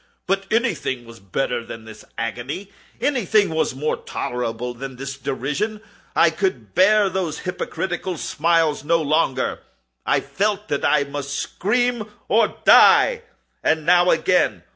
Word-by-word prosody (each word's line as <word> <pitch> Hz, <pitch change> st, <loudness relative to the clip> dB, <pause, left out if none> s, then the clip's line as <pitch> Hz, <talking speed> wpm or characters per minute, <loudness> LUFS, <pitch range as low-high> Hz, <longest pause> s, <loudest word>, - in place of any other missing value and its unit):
But 195 Hz, +1 st, -1 dB
anything 195 Hz, -, 0 dB
was 115 Hz, -2 st, -13 dB
better 120 Hz, +5 st, -2 dB
than 115 Hz, -1 st, -9 dB
this 110 Hz, -1 st, -12 dB
agony! 125 Hz, -, -4 dB, 0.3 s
Anything 215 Hz, -, +2 dB
was 160 Hz, -5 st, 0 dB
more 150 Hz, +3 st, -1 dB
tolerable 125 Hz, 0 st, -4 dB
than 130 Hz, +2 st, -8 dB
this 135 Hz, +2 st, -6 dB
derision! 140 Hz, -, -3 dB, 0.4 s
I 165 Hz, -, +5 dB
could 150 Hz, -, -3 dB
bear 205 Hz, +2 st, +5 dB
those 185 Hz, -5 st, -3 dB
hypocritical 180 Hz, 0 st, -4 dB
smiles 165 Hz, -1 st, +1 dB
no 165 Hz, +3 st, +2 dB
longer! 150 Hz, -4 st, 0 dB, 0.4 s
I -, -, +2 dB
felt 210 Hz, +1 st, -2 dB
that 145 Hz, -, -1 dB
I 150 Hz, -2 st, +3 dB
must 140 Hz, 0 st, -5 dB
scream 240 Hz, +1 st, -1 dB, 0.2 s
or 225 Hz, +3 st, +2 dB
die! 480 Hz, -2 st, +6 dB, 0.4 s
and 160 Hz, -1 st, +1 dB
now—again! 175 Hz, -, +3 dB
160 Hz, 130 wpm, -21 LUFS, 130-195 Hz, 0.4 s, die